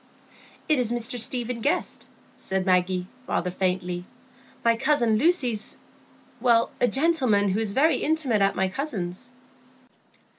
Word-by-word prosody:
"It 305 -4 +2
is 240 -2 0
Mr 240 +1 -1
Stephen 240 0 0
Guest," 285 - -2 0.3
said 190 -1 -2
Maggie, 180 -1 +1 0.2
rather 180 +1 -1
faintly. 180 -1 -2 0.6
"My 230 0 +4
cousin 235 -4 +2
Lucy's—a 260 -8 +1 1.1
gentleman 255 -7 +2
who 195 +3 0
is 215 -3 0
very 310 +7 +3
intimate 290 -9 0
at 195 0 +2
my 190 0 +1
cousin's." 210 - -5
225 Hz, 115 wpm, -25 LUFS, 190-265 Hz, 1.1 s, My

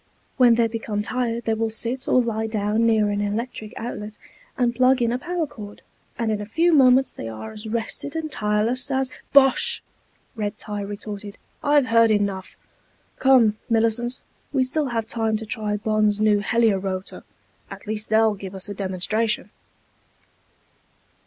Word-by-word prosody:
When 245 -2 +6
they 230 0 +3
become 225 -2 -3
tired 235 0 -2
they 225 - +1
will 225 0 -1
sit 235 +3 -4
or - - +4
lie 220 -1 -2
down 215 +1 +1
near 215 -2 +3
an 205 0 -1
electric 215 +1 -3
outlet 215 -2 -6 0.4
and 245 -2 +2
plug 255 +1 +4
in 235 -1 +1
a 245 - -1
power 345 +4 -2
cord, 210 -7 -11 0.3
and 230 -2 0
in 210 -1 -2
a - - -5
few 335 +9 +2
minutes 265 -2 +5
they 115 - -6
are 110 0 -7
as 215 +1 -9
rested 235 +6 -3
and 320 -1 -3
tireless 220 +5 0
as...." 265 -1 0 0.2
"Bosh!" 270 -2 +4 0.5
Red 210 -1 -3
tie 210 -1 -5
retorted. 205 0 -7 0.3
"I've 290 -2 +4
heard 230 -1 +4
enough. 200 -3 -1 0.6
Come, 240 -5 +4
Millicent, 230 +2 0 0.3
we 270 -2 +2
still 285 +3 -1
have 230 -3 -2
time 225 -1 -1
to 220 - -7
try 210 -1 -2
Bonn's 215 -1 +1
new 215 -1 +3
Helio 220 -1 +2
rotor. 190 0 -5 0.5
At - - -10
least 215 0 -1
they'll 220 0 +4
give 195 -1 -8
us 190 +1 -6
a 205 - -5
demonstration." 200 +4 -1
220 Hz, 165 wpm, -23 LUFS, 210-245 Hz, 0.6 s, When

